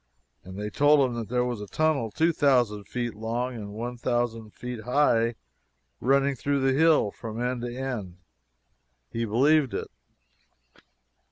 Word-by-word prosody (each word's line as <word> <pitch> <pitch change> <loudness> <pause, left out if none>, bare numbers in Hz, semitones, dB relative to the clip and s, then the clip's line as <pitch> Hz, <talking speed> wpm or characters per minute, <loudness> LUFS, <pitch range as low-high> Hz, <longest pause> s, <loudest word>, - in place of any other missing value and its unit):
And 95 +1 -10
they 105 +1 -4
told 145 +2 +4
him 115 -1 -3
there 125 +2 0
was 120 -4 -3
a 105 - -7
tunnel 155 -3 +1
2,000 130 -8 +2
feet 120 -1 -3
long 115 +4 -3
and 105 -3 -7
1,000 120 0 -2
feet 125 +1 -7
high 120 -2 +2 0.6
running 140 +2 +3
through 140 +2 -1
the 135 0 +3
hill, 155 -8 +4
from 110 +1 -7
end 125 0 -1
to 120 0 -5
end. 115 -9 -4 0.9
He 115 0 -2
believed 135 +5 +3
it. - - -4
120 Hz, 140 wpm, -26 LUFS, 110-135 Hz, 0.9 s, told